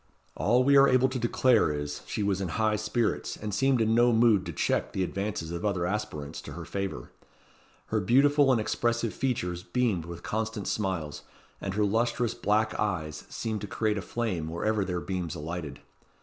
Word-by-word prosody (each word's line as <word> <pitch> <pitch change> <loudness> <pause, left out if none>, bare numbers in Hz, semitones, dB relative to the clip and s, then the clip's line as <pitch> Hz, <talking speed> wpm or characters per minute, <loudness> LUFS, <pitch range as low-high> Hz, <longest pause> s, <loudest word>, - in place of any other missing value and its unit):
All 125 +1 +3
we 140 +2 +4
are 140 0 +7
able 130 +1 +4
to 130 -1 -3
declare 120 -5 +3
is, 75 0 -4
she 105 - -2
was 100 -1 0
in 95 - -1
high 110 +5 +1
spirits, 110 +2 -1
and 105 -1 -5
seemed 135 +4 +2
in 110 0 +2
no 120 +1 +5
mood 110 -5 +4
to - - -3
check 75 - -1
the 95 - 0
advances 95 -3 -3
of 85 0 -4
other 95 -4 0
aspirants 90 -7 -4
to - - -9
her 85 -1 -7
favour. 95 -8 -4 0.8
Her 110 - +1
beautiful 140 +7 +4
and 125 - +3
expressive 120 +1 0
features 90 -10 -2
beamed 105 -5 0
with 85 0 -8
constant 110 -1 -3
smiles, 95 -8 -2 0.4
and 95 -1 -3
her 105 0 +2
lustrous 115 +2 +1
black 110 +1 +1
eyes 80 -7 -2
seemed 110 -2 -3
to 105 - -5
create 105 0 0
a - - -4
flame 95 -8 -2
wherever 105 +5 0
their 90 -2 -2
beams 90 -4 -3
alighted. 80 -2 -6
105 Hz, 185 wpm, -28 LUFS, 90-115 Hz, 0.8 s, are